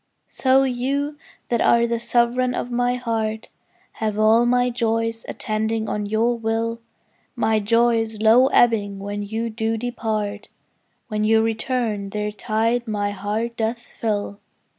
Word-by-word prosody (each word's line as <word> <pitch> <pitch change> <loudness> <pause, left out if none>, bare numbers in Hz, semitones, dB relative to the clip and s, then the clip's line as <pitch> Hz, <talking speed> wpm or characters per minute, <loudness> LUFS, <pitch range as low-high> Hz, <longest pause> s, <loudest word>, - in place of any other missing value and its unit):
So 265 0 +3
you 270 +3 -1 0.3
that 235 -1 +1
are 235 0 +4
the 235 0 -1
sovereign 245 +1 +1
of 245 - -4
my 245 +1 +1
heart 225 -3 -3 0.4
Have 215 -2 -3
all 220 +2 +4
my 245 0 +2
joys 230 -1 -1
attending 220 0 -2
on 210 -1 -2
your 225 +3 +1
will; 230 +1 -2 0.5
My 220 -2 +2
joys 225 0 +1
low 225 +4 +6
ebbing 215 -6 +3
when 205 +1 -5
you 220 +3 -3
do 225 0 -1
depart, 215 -3 -3 0.6
When 215 -2 -2
you 220 +1 +4
return 225 -2 -1
their 210 +1 -3
tide 225 +3 -1
my 205 -2 -1
heart 210 +4 -3
doth 230 +2 -2 0.2
fill. 205 -2 -2
225 Hz, 140 wpm, -22 LUFS, 215-240 Hz, 0.6 s, low